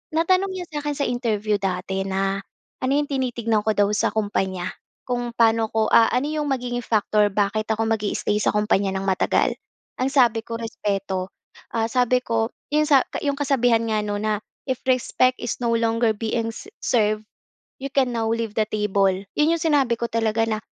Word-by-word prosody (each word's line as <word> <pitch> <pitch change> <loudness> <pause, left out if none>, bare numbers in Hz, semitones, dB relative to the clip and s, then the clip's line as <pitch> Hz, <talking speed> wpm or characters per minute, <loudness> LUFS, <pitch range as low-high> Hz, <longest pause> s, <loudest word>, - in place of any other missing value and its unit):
Natanong 370 +4 +2
niya 370 -1 -5
sa - - -3
akin 295 0 -2
sa 280 - 0
interview 215 -4 0
dati 190 0 -2
na, 195 0 -1 0.4
ano 255 - +1
‘yong 295 - +1
tinitignan 235 -5 0
ko 220 - +2
daw 205 -1 +4
sa 210 - +2
kumpanya, 190 -4 -1 0.3
kung 245 -1 -2
paano 225 -1 +4
ko 220 -1 +2
ah, 225 - +7
ano 250 +4 +1
‘yong 300 -1 -1
magiging 245 -2 -2
factor 210 -1 +2
bakit 205 +2 0
ako 220 0 +1
mag-i-stay 210 -1 0
sa - - +2
kumpanya 210 -2 +2
nang 190 0 -2
matagal. 190 -1 +2 0.5
Ang 260 - +2
sabi 240 -5 +4
ko, 230 0 -5
"Respeto." 195 -4 -3 0.4
Ah, 225 -1 +1
sabi 250 0 +3
ko, 225 0 0 0.2
‘yong 305 0 +3
sa 275 -4 +5
ka - - -5
‘yong 285 -1 0
kasabihan 245 -5 +2
nga, 215 -1 0
'no, 205 0 -2
na, 210 0 -1 0.3
"If 255 -1 0
respect 255 0 +2
is 240 - -2
no 235 -1 +1
longer 230 0 +2
being 225 +1 -2 0.3
served, 215 -2 +1 0.6
you 275 - -3
can 260 -3 +2
now 225 -1 0
leave 230 -2 -2
the 215 - +3
table." 200 -2 +2 0.3
‘Yon 300 +2 +4
‘yong 330 - -5
sinabi 285 -7 +3
ko 235 - -1
talaga 225 0 +1
na, 215 - 0
225 Hz, 185 wpm, -23 LUFS, 210-250 Hz, 0.6 s, ah